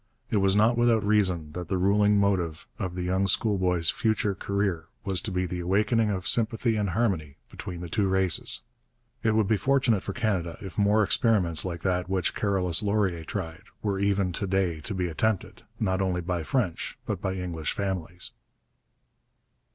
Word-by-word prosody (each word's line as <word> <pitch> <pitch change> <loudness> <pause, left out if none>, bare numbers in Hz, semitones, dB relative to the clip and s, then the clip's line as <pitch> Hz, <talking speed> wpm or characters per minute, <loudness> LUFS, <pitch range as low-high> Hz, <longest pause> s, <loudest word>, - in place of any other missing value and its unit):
It 110 - +2
was 95 -1 +3
not 115 +3 +3
without 115 -2 +3
reason 95 -7 +1
that 90 +2 -6
the 95 - -1
ruling 105 +2 +3
motive 90 -6 0
of 90 -4 -3
the 90 - -3
young 95 +2 +1
schoolboy's 90 -5 +2
future 110 -2 0
career 95 -4 -2 0.2
was 95 -3 0
to - - -4
be 90 0 0
the 90 0 -4
awakening 105 +5 +1
of 95 -3 -2
sympathy 115 0 +3
and 105 -2 0
harmony 90 -8 -1
between 90 -2 -7
the 90 - -5
two 100 +4 0
races. 95 +7 +2 0.6
It 110 -1 +1
would 110 -3 +2
be 110 - +2
fortunate 130 -5 +2
for - - -5
Canada 95 -8 -1
if 95 -3 -8
more 105 +1 +3
experiments 95 - +3
like 85 -2 -4
that 90 -1 -1
which 95 -3 0
Carolus 95 -5 +1
Laurier 100 -5 0
tried 80 +3 -6 0.2
were 100 -2 -1
even 100 -2 +1
to 100 +3 -2
day 95 -4 0
to 100 - -4
be 90 -1 -1
attempted, 100 +5 -2 0.2
not 95 -3 0
only 90 -2 0
by 90 0 -2
French 95 0 -2
but - - -3
by 95 0 -2
English 85 -4 -3
families. 90 -3 -3
95 Hz, 175 wpm, -27 LUFS, 90-105 Hz, 0.6 s, was